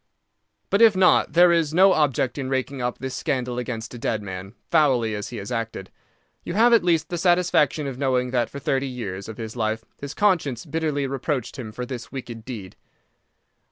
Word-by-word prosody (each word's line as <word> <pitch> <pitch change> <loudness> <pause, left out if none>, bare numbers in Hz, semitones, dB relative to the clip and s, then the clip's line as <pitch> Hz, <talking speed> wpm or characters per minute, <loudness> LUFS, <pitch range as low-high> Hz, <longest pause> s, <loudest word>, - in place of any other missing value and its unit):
"But 200 - +3
if 225 -3 +7
not, 185 -1 +4
there 175 +1 +6
is 165 -2 +1
no 190 +1 +6
object 135 -3 +1
in 130 -1 -3
raking 135 0 -2
up 120 0 -2
this 130 -1 -5
scandal 125 -5 -2
against 115 -2 -5
a 120 - -8
dead 110 -2 -2
man, 95 +2 -7 0.2
foully 130 -9 +3
as 105 -1 -4
he 120 - -7
has 100 +4 -6
acted. 115 -5 -4 0.5
You 170 - -5
have 235 +3 +5
at 230 - +5
least 165 -3 +1
the 175 - -3
satisfaction 175 -4 +2
of 135 -2 -5
knowing 130 -2 +1
that 120 -2 +1
for - - -8
thirty 135 0 -1
years 100 -6 -6
of 110 - -8
his 110 0 -6
life 110 -1 -2
his 140 0 -7
conscience 160 - +1
bitterly 155 -3 -1
reproached 135 -1 -3
him 110 -4 -6
for 125 +3 -5
this 120 -2 -7
wicked 120 -4 -7
deed. 105 -8 -7
130 Hz, 195 wpm, -24 LUFS, 115-155 Hz, 0.5 s, if